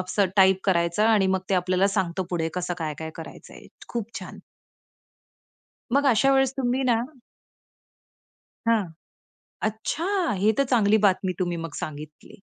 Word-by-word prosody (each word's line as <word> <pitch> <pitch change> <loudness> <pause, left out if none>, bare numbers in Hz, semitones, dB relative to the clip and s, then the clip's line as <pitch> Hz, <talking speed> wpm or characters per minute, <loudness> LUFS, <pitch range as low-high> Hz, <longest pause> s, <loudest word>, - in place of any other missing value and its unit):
असं 190 +2 +1
टाइप 190 -1 +5
करायचा 170 +2 +2
आणि 210 -4 +4
मग - - -4
ते - - +3
आपल्याला 185 +2 +2
सांगत 190 -3 -1
पुढे 165 -2 -1
कसं 180 -1 -2
काय-काय 160 0 -4
करायचंय. 165 - -11 0.2
खूप 230 -3 -4
छान. - - -10 1.5
मग 280 +1 +3
अशा 265 +2 +4
वेळेस 270 -1 +3
तुम्ही 255 0 0
ना 240 -3 +2 1.7
हां. 225 -3 +3 0.8
अच्छा! 220 +9 -2 0.3
हे 205 +4 +3
तर 275 - +4
चांगली 220 -5 +3
बातमी 190 -3 +2
तुम्ही 175 -2 -1
मग 165 -2 -6
सांगितली. 150 0 -8
195 Hz, 135 wpm, -25 LUFS, 175-225 Hz, 1.7 s, टाइप